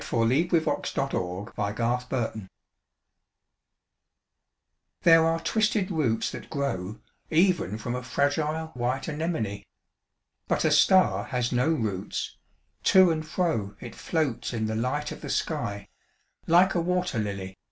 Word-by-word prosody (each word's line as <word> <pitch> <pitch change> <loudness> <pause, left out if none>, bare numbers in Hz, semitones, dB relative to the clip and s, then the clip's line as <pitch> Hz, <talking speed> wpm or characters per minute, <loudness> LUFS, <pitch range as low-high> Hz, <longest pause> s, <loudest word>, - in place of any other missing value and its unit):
DiqllzodbvCoOgle 155 +9 +1
STAR 135 0 -2 1.2
SONG 105 -4 -9 2.5
These 165 - +7
are 165 0 +3
twisted 215 -2 +1
roots 130 -10 0
that - - -9
grow 110 - -3 0.3
Even 165 - +2
from 120 +3 -4
a 125 - -3
fragile 150 +5 -1
white 125 +2 -2
anemone. 150 - -2 0.8
'But - - +1
a - - +3
star 190 -1 +4
has 125 -2 -1
no 125 +4 +2
roots: 110 - -2 0.5
to 185 -2 +6
and 155 -1 -1
fro 155 - -1
It 120 - -8
floats 155 -8 -2
in 110 -2 -1
the 110 0 -2
light 130 +6 -1
of - - -8
the - - -7
sky, 100 0 -2 0.6
like 180 +3 +5
a 175 - +1
wat«r 180 -8 0
]ily. 95 -2 -5
140 Hz, 120 wpm, -27 LUFS, 110-165 Hz, 2.5 s, These